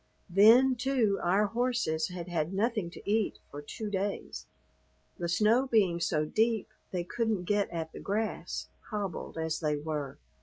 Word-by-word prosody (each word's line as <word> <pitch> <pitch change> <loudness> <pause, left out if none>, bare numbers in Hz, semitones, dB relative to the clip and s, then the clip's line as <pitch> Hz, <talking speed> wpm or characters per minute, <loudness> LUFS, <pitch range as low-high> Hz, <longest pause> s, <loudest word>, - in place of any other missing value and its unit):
Then, 230 +8 +7
too, 250 -5 +1
our 195 +4 +3
horses 230 -8 0
had 180 -2 -7
had 170 0 -1
nothing 215 -2 0
to - - -13
eat 215 0 +1
for 145 - -7
two 210 +8 -6
days, 200 0 -3 0.7
the 170 -1 -2
snow 220 +9 +3
being 195 -8 +3
so 155 -2 +1
deep 220 +5 +1 0.2
they 180 -2 -2
couldn't 220 0 -1
get 205 +2 +1
at 165 -2 -4
the - - -9
grass, 215 +2 -3 0.2
hobbled 200 -6 -4
as 160 0 -1
they 150 -2 0
were. 150 -2 -4
200 Hz, 155 wpm, -30 LUFS, 170-220 Hz, 0.7 s, Then